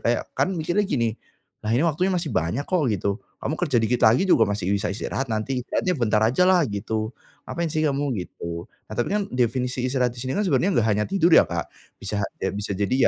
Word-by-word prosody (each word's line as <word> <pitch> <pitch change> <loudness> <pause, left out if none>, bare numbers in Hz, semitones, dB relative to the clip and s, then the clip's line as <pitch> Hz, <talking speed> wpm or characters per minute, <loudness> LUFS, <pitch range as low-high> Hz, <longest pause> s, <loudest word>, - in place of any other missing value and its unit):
kayak 120 +1 -1
kan - - +1
mikirnya 175 +5 +1
gini, 115 - +1 0.5
"Lah 110 - 0
ini 120 - +3
waktunya 180 +4 +1
masih 170 -3 -1
banyak 115 +13 0
kok 180 -5 +2
gitu, 100 +2 -1 0.2
kamu 150 - -2
kerja 150 -8 0
dikit 120 +2 +1
lagi 115 - +5
juga 115 - +6
masih 100 -3 -2
bisa 100 0 0
istirahat 130 +4 -3
nanti 125 +4 -1
istirahatnya 180 - 0
bentar 110 -4 +2
ajalah 180 +10 +4
gitu 110 +3 -3 0.4
ngapain 170 -1 -2
sih 155 - 0
kamu." 145 -1 +1 0.2
gitu. 85 -1 -6 0.2
Nah, - - -9
tapi 120 - 0
kan 205 -1 +1
definisi 125 +1 0
istirahat 125 -2 +1
di 120 - -10
sini 130 +5 -3
kan, 210 - +1
sebenarnya 175 +1 +2
enggak 115 -1 +3
hanya 105 +1 +1
tidur 180 -3 +2
ya - - +8
Kak, - - -3 0.3
bisa 100 +1 -3 0.2
ya 95 - 0
bisa 100 0 -3
jadi 100 +4 0
125 Hz, 210 wpm, -24 LUFS, 110-160 Hz, 0.5 s, ya